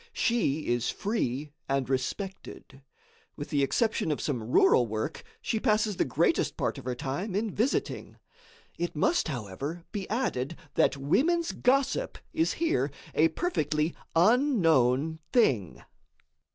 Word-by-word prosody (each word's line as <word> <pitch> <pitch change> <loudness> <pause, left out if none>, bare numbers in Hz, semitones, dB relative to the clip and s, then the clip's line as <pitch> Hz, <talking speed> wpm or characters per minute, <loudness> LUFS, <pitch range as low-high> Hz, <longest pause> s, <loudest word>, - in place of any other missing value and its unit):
She 185 - +1
is 120 0 0
free 150 - -2 0.2
and 135 -1 0
respected. 135 +1 -4 0.5
With 145 - -7
the 145 - +2
exception 215 - +1
of 150 - -1
some 130 -6 -2
rural 120 +1 +4
work, 110 0 -4 0.2
she 220 - 0
passes 215 -1 +1
the - - +2
greatest - - +1
part - - -1
of - - -12
her 125 -1 -2
time 145 - -3
in 215 +1 0
visiting. 240 +6 -1 0.6
It 175 -1 -2
must, 330 - +2
however, 140 - -5
be 200 -3 -5
added 170 - -1 0.2
that - - +2
women's 325 - +1
gossip 275 - +1 0.2
is 325 0 +1
here 230 - 0 0.2
a 160 - +4
perfectly 155 - -1 0.2
unknown 165 - +3
thing. 120 - +2
160 Hz, 130 wpm, -28 LUFS, 135-225 Hz, 0.6 s, rural